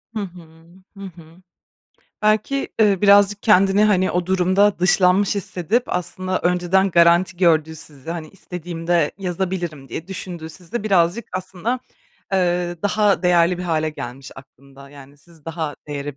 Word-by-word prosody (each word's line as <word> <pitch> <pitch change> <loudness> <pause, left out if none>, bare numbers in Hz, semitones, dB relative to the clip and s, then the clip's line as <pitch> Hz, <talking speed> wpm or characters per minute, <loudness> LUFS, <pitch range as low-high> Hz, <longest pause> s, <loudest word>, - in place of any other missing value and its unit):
Hı - - -1
hı, 165 -4 -10 0.3
hı 195 - -9
hı. 170 -2 -14 0.9
Belki, 215 +6 +1
eee, 205 -3 +4
birazcık 205 0 +5
kendini, 195 -1 +4
hani, 190 -3 +2
o 180 0 -1
durumda 190 +2 +2
dışlanmış 185 +2 +3
hissedip, 200 +4 -1
aslında 185 +1 -3
önceden 180 +2 +1
garanti 170 +2 +4
gördüğü 160 -3 +2
sizi, 145 +1 -10
hani, 165 -2 -5
"İstediğimde 175 -3 -3
yazabilirim." 175 -6 -4
diye 165 +9 -7
düşündüğü 175 -4 -7
sizi 190 +7 -7
birazcık 195 +1 +1
aslında, 190 +6 -3 0.5
eee, 175 -1 0
daha 205 -1 +2
değerli 175 0 +3
bir - - -4
hâle 155 -3 -1
gelmiş 130 -2 -8
aklında. 140 +1 -16
Yani, 140 0 -15
siz 160 0 -19
daha 160 -2 -4
değere 145 -1 -5
180 Hz, 135 wpm, -20 LUFS, 165-195 Hz, 0.9 s, birazcık